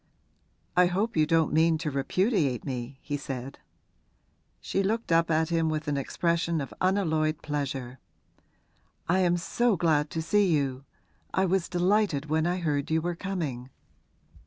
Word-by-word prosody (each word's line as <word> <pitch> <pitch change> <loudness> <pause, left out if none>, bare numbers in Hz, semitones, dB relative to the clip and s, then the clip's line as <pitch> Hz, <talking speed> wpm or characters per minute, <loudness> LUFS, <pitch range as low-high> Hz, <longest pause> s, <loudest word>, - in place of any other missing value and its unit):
'I 180 0 +6
hope 200 +6 -1
you 155 -1 +3
don't 160 -2 +2
mean 160 +1 +4
to 155 -1 -3
repudiate 140 - 0
me,' 130 -1 -5
he 145 -1 -3
said. 135 -2 -6 1.0
She 195 - -1
looked 220 +1 -1
up 165 0 +3
at 160 0 +2
him 165 -1 +1
with 155 -1 -3
an 145 - 0
expression 170 +4 0
of 140 - -5
unalloyed 160 -5 +1
pleasure. 135 -4 -4 1.1
'I 185 +3 +2
am 175 -1 +3
so 225 +4 +1
glad 155 -3 +2
to 165 - -4
see 205 +4 +3
you. 135 -3 0 0.5
I 190 - +3
was 190 -1 0
delighted 180 -4 +1
when 160 +1 +2
I 180 +1 0
heard 150 -4 -1
you 160 0 +2
were 175 +2 -2
coming.' 160 -10 -4
160 Hz, 155 wpm, -27 LUFS, 145-180 Hz, 1.1 s, I